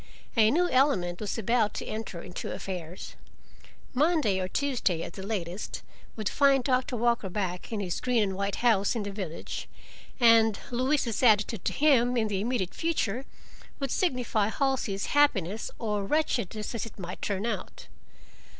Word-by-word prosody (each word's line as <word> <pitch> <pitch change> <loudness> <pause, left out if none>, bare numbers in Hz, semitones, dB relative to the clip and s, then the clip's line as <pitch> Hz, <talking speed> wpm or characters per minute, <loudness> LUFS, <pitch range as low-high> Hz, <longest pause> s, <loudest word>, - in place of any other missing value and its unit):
A 220 -2 +6
new 350 +8 +3
element 220 - +2
was 210 - -3
about 225 0 +1
to - - -4
enter 215 -6 -5
into 180 - -6
affairs: 180 -2 -6 0.8
Monday, 290 - +2
or 185 - -1
Tuesday 230 - 0
at - - -7
the 195 - -8
latest, 190 -2 -4 0.3
would 215 -3 -3
find 275 0 +4
Doctor 255 0 +1
Walker 235 -3 +1
back 180 -1 -3
in 215 -2 -2
his 180 -3 -2
green 245 -3 +2
and 195 -2 -2
white 200 +1 -1
house 210 -2 +3
in 225 - -1
the 200 - -4
village, 190 -5 -6 0.5
and 225 -3 +6
Louise's 255 -2 +1
attitude 215 -3 +3
to - - 0
him 250 -4 +4
in 220 -2 +1
the 195 -2 -1
immediate 220 -5 -1
future 270 -7 -1 0.5
would 275 -3 -2
signify 250 - +1
Halsey's 245 -7 -1
happiness 220 - +2
or 210 -3 -1
wretchedness, 220 - -1
as 230 -1 -3
it - - -14
might 180 -2 -7
turn 200 +1 -2
out. 215 -6 -4
220 Hz, 160 wpm, -28 LUFS, 195-255 Hz, 0.8 s, A